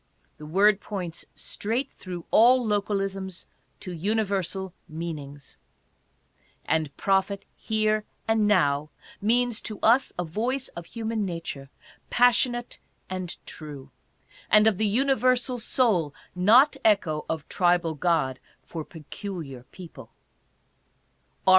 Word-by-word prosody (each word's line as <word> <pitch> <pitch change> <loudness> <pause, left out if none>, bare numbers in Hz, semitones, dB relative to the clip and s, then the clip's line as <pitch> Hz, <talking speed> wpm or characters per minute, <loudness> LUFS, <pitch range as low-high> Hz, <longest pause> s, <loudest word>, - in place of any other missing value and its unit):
The 150 - -9
word 200 +5 +4
points 180 -5 -5
straight 230 +6 -2
through 180 -3 -8
all 245 +2 +6
localisms 195 -3 -2 0.4
to 180 - -6
universal 190 0 -1 0.2
meanings. 150 -3 -7 1.1
And 155 -3 0
prophet 195 0 +1
here 215 -1 0 0.2
and 220 -2 +3
now 150 -7 +2 0.3
means 240 +2 +1
to 215 -2 -6
us 240 +4 +4
a 180 - 0
voice 240 +11 -1
of 170 -1 -9
human 225 -1 -3
nature, 165 -7 -5 0.4
passionate 245 0 +2 0.3
and 185 -2 -4
true; 145 -3 -8 0.6
and 215 0 +6
of 220 -4 +3
the 215 - +3
universal 255 +1 +2
soul, 200 - +2 0.2
not 225 +11 +5
echo 170 -8 +2
of 160 -3 -3
tribal 175 -3 +2
god 150 -4 +1 0.2
for 165 -2 -6
peculiar 155 -4 -8
people. 160 -10 -11
195 Hz, 110 wpm, -26 LUFS, 165-220 Hz, 1.1 s, all